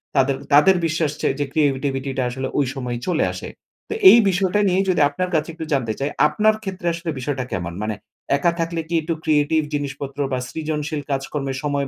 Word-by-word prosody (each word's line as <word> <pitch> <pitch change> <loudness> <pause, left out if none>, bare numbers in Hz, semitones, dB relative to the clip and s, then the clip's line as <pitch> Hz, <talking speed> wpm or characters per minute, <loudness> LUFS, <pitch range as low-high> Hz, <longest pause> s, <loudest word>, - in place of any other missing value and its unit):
তাদের 135 0 +3 0.2
তাদের 170 +7 +7
বিশ্বাস 160 -2 0
যে, - - +1
যে 145 - +1
ক্রিয়েটিভিটিটা 135 -2 0
আসলে 130 +2 -4
ঐ - - +3
সময়ই 125 -3 -4
চলে 175 -3 +2
আসে। - - -7 0.4
তো - - -2 0.2
এই - - +9
বিষয়টা 190 +2 +1
নিয়েই 190 +1 +2
যদি 180 -4 +2
আপনার 180 +5 -3
কাছে 155 +1 0
একটু 160 0 -6
জানতে 120 -5 0
চাই, 140 +2 -1 0.2
আপনার 215 +8 +2
ক্ষেত্রে 190 -3 -4
আসলে 170 0 -5
বিষয়টা 130 0 -2
কেমন? 85 -1 -3
মানে 105 0 -2 0.4
একা 170 +4 +2
থাকলে 165 0 -1
কি - - -4
একটু 165 +2 -2
ক্রিয়েটিভ 155 0 +2
জিনিসপত্র 140 -1 -4
বা 130 - 0
সৃজনশীল 155 -1 -3
কাজকর্মে 135 0 -2
সময় 140 -2 -1
145 Hz, 185 wpm, -21 LUFS, 135-165 Hz, 0.4 s, এই